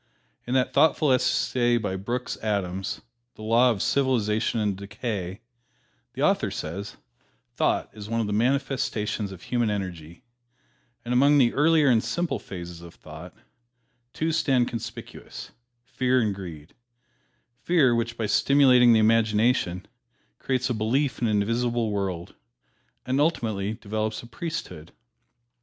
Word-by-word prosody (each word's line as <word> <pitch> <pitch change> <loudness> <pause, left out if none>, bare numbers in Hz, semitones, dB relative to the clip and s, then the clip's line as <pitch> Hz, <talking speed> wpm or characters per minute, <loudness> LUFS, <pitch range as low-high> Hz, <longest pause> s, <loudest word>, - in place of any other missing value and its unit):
In 125 - -1
that 130 -1 +1
thoughtful 150 0 +3
essay 125 -1 +2
by 105 -5 -2
Brooks 120 +6 -3
Adams, 95 -3 -3 0.3
"The 110 - -11
Law 115 +3 +4
of 110 -6 -1
Civilization 115 -5 +1
and 105 -2 0
Decay," 100 -2 -5 0.7
the - - -3
author - - +2
says, 100 +6 -6 0.6
"Thought - - 0
is 105 -1 -9
one 115 0 -1
of 115 - 0
the 105 - -3
manifestations 110 -4 -1
of 95 -3 -11
human 120 -3 0
energy, 90 -3 -5 0.8
and 120 - -2
among 140 +4 +5
the 125 -4 +4
earlier 155 0 +4
and 115 -4 +4
simpler 135 +2 -2
phases 85 -3 -9
of 85 -1 -12
thought, 80 +3 -11 0.8
two 160 +1 -1
stand 135 -6 +2
conspicuous 115 - -8 0.3
Fear 130 0 +1
and 105 -3 0
Greed: 85 -5 -9 0.9
Fear, 155 -8 +3
which, 120 0 -2
by 110 - -1
stimulating 125 0 +5
the 110 - +5
imagination, 110 -4 +2 0.5
creates 130 -1 -1
a 125 - -1
belief 120 +4 0
in 120 - +2
an 105 -2 +2
invisible 115 0 -1
world, 95 -4 -3 0.7
and 130 +2 +1
ultimately 110 -10 0
develops 110 +1 -3
a - - -10
priesthood." 135 - -6
115 Hz, 135 wpm, -25 LUFS, 100-125 Hz, 0.9 s, among